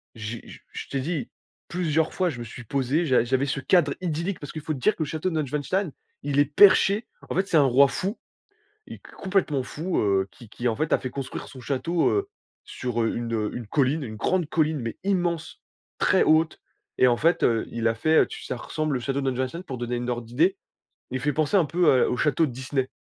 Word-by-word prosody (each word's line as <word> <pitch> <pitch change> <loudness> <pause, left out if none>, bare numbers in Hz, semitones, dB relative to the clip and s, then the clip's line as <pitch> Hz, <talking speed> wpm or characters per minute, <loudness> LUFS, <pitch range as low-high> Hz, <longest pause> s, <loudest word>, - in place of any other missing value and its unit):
j'ai 110 +1 -6
je - - -11
je - - -7
t'ai 135 - -2
dit 155 0 -3 0.4
plusieurs 160 -3 0
fois; 185 -1 +1
je 120 -7 -6
me - - -4
suis 120 +2 -9
posé, 140 +7 0
j'a 130 -5 +3
j'avais 130 +3 +1
ce 140 0 -2
cadre 145 +1 +3
idyllique, 170 +2 -2
parce 145 - -8
qu'il 155 - -6
faut 155 -1 -2
te 140 - -6
dire 215 - +2
que 160 - -2
le - - -4
château 155 +5 -2
de 160 - -4
Neuschwanstein, 150 +6 -1 0.3
il 145 0 0
est 145 - +6
perché, 200 - +5 0.2
en - - -3
fait, 190 +1 +1
c'est 170 - +3
un 150 - +6
roi 135 +2 +6
fou 190 - -3 0.7
et - - -9
complètement 185 -8 -1
fou, 165 +8 -2
heu, 95 -2 +2
qui 120 -4 -15
qui, 120 +2 -3
en 115 - +1
fait, 155 +4 0
a - - +3
fait 130 - -4
construire 135 +1 -6
son 130 - -11
château, 160 +6 0
heu, 400 0 0 0.4
sur, 120 -2 -3
heu, 115 - 0
une 115 -3 -2
une 120 -4 -6
colline, 140 +5 +1
une 110 -4 -6
grande 180 - 0
colline, 155 -1 +1
mais 115 -1 -5
immense, 175 -4 -1 0.4
très - - +4
haute 160 +1 +3 0.4
et 130 - +6
en 120 -1 +3
fait, 165 +6 +2
heu, 115 -2 +2
il 115 -1 -1
a 115 - +1
fait, 155 +7 +2
heu, - - +5
tu - - -9
ça - - -4
ressemble 155 +2 -2
le - - -1
château 135 +3 -2
de 135 - +1
Neuschwanstein 130 +8 -3
pour 130 -7 -6
donner 120 0 -2
une 120 +1 -3
ordre 120 -1 -3
d'idée. 165 +11 +2 0.5
Il 130 0 -2
fait 145 +2 0
penser 155 +6 +1
un 180 - +5
peu 155 -3 +3
à - - 0
au 125 - -1
château 155 +4 +2
de 130 - -5
Disney. 130 +1 -2
145 Hz, 235 wpm, -25 LUFS, 125-165 Hz, 0.7 s, est